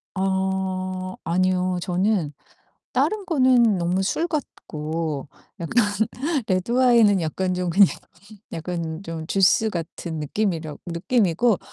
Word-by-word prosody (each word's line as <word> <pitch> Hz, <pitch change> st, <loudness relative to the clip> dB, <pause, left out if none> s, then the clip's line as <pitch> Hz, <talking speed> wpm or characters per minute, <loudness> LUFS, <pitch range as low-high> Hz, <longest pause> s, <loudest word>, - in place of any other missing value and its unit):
어 190 Hz, -1 st, -2 dB
아니요. 185 Hz, +1 st, +1 dB
저는 180 Hz, -4 st, 0 dB, 0.6 s
다른 425 Hz, -2 st, +1 dB
거는 255 Hz, -, +4 dB
너무 180 Hz, +2 st, 0 dB
술 320 Hz, -, 0 dB
같고 155 Hz, -, -4 dB, 0.3 s
약간 215 Hz, +7 st, +2 dB, 0.6 s
레드와인은 225 Hz, +1 st, +4 dB
약간 180 Hz, +3 st, -1 dB
좀 180 Hz, -1 st, -1 dB
그냥 195 Hz, +2 st, +6 dB, 0.6 s
약간 165 Hz, 0 st, -4 dB
좀 165 Hz, -3 st, -6 dB
주스 195 Hz, +4 st, +3 dB
같은 165 Hz, -1 st, -5 dB
느낌이라고 160 Hz, -2 st, -2 dB
느낌이고 190 Hz, +3 st, +1 dB
185 Hz, 220 characters per minute, -23 LUFS, 170-205 Hz, 0.6 s, 그냥